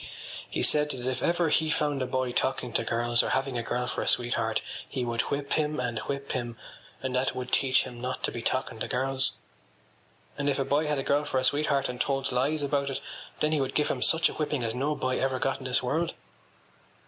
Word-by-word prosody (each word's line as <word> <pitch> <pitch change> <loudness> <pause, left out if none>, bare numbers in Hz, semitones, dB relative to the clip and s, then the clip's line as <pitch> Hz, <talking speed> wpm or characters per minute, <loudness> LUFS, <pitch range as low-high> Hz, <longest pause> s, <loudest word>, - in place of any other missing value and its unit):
He - - -1
said 150 0 +4
that 125 -4 -4
if 130 0 -1
ever 170 -1 +2
he 160 +1 +3
found 145 -3 +1
a 130 - 0
boy 130 -1 0
talking 125 -1 0
to - - +2
girls 120 +1 +2
or - - -2
having 135 -1 0
a 120 - 0
girl 125 +1 -1
for - - -2
a - - -3
sweetheart 115 -2 +2 0.3
he 130 -3 -2
would 115 -1 +1
whip 140 0 -1
him 150 -2 +1
and 120 -3 -1
whip 140 0 -4
him; 120 -3 -3 0.5
and 130 -1 -1
that 130 +1 +1
would 125 0 -4
teach 130 -2 +4
him 120 -2 -8
not 125 +1 -3
to - - +1
be 120 - -5
talking 125 -1 -1
to - - -2
girls. 130 +1 0 1.1
And 145 0 +1
if 140 - +1
a 135 - 0
boy 145 +3 +2
had 150 -1 +1
a 135 - -1
girl 145 +1 +2
for 135 - -1
a 130 - +2
sweetheart 140 0 +2
and 125 0 -3
told 135 -1 0
lies 140 +5 +1
about 140 0 +1
it 135 - -2 0.4
then 150 - +2
he 155 -2 +2
would 135 0 -2
give 150 - +2
him 125 - -1
such 165 +5 +4
a - - -4
whipping 150 -4 -1
as 115 -1 -1
no 140 +5 0
boy 130 -2 0
ever 130 0 +1
got 135 +1 0
in 130 - -9
this 130 0 +1
world. 160 +7 0
130 Hz, 240 wpm, -28 LUFS, 125-145 Hz, 1.1 s, said